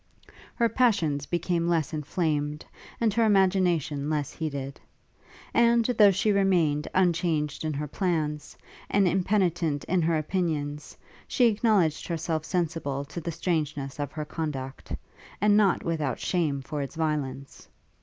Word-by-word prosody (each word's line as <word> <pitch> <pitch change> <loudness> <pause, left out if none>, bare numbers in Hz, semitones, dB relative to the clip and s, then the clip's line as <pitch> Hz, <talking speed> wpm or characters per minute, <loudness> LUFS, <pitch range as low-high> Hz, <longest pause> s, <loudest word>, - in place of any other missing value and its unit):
Her 235 - +3
passions 175 - +1
became 175 0 0
less 165 -3 0
inflamed, 150 -1 -2 0.3
and 225 -3 +2
her 230 +2 +2
imagination 180 -8 +2
less 150 -3 -1
heated; 140 -4 -5 0.7
and, 235 -1 +4
though 220 -4 +5
she 195 +3 +1
remained 175 -7 +2
unchanged 165 -5 +1
in 155 -1 -1
her 150 +1 -3
plans, 155 -3 -2 0.3
and 200 -2 +3
impenitent 175 -5 +1
in 180 0 +1
her 165 0 +2
opinions, 155 -3 -2 0.3
she 250 - +3
acknowledged 210 -8 +2
herself 160 -2 -2
sensible 155 -5 -2
to 170 +4 -7
the 170 - -3
strangeness 150 -4 -2
of 145 -1 -3
her 155 -1 -5
conduct; 150 -4 -5 0.5
and 205 +1 +4
not 205 -3 +3
without 155 -6 -1
shame 150 -7 -1
for 145 +2 -4
its 140 +4 -6
violence. 145 -4 -3
160 Hz, 135 wpm, -27 LUFS, 150-185 Hz, 0.7 s, though